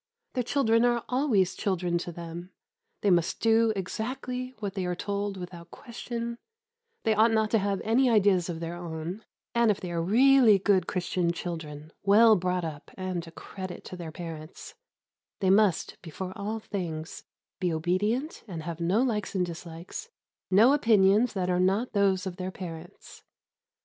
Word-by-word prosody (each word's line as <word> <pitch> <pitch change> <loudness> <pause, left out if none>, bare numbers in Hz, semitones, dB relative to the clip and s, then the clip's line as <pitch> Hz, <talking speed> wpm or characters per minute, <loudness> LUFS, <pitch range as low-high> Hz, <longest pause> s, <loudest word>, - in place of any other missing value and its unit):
Their 255 - 0
children 235 -2 +2
are 240 -1 +2
always 250 -8 +2
children 180 -4 -1
to 175 - -5
them; 170 +1 -8 0.5
they 200 - +3
must 175 -1 +2
do 225 0 +4
exactly 250 +6 -4
what 205 -3 -4
they 190 -3 -2
are 180 - -1
told 200 +1 -3
without 175 -2 -9
question; 235 -1 -6 0.6
they 220 - +3
ought 220 +2 +5
not 220 -1 +1
to 225 - +4
have 200 -1 -1
any 245 +4 +3
ideas 195 -5 +3
of 165 -2 -4
their 165 0 -4
own, 175 +3 -6 0.3
and, 235 -1 +3
if 205 - +1
they 180 -2 -6
are 170 -1 -1
really 240 +3 +6
good 195 -1 +2
Christian 180 -1 0
children, 160 -3 -6
well 215 +3 +6
brought 180 -1 -1
up 150 -3 -7
and 185 -3 -3
a - - -10
credit 185 +2 -8
to - - -7
their 170 -3 -7
parents, 160 -1 -8 0.7
they 190 -2 +3
must, 200 -4 +2
before 180 +3 -6
all 215 +1 -3
things, 175 -7 -5 0.4
be 180 -2 0
obedient 205 - -1
and 165 -5 -6
have 170 0 -5
no 190 +8 +2
likes 215 -6 -2
and 180 -1 +2
dislikes, 170 - -8 0.4
no 220 +8 +6
opinions 220 -3 +4
that 185 -3 -1
are 180 - +1
not 195 +7 +1
those 195 -2 +2
of 185 -1 -5
their 185 -1 -3
parents. 175 -3 -9
190 Hz, 165 wpm, -28 LUFS, 175-225 Hz, 0.7 s, really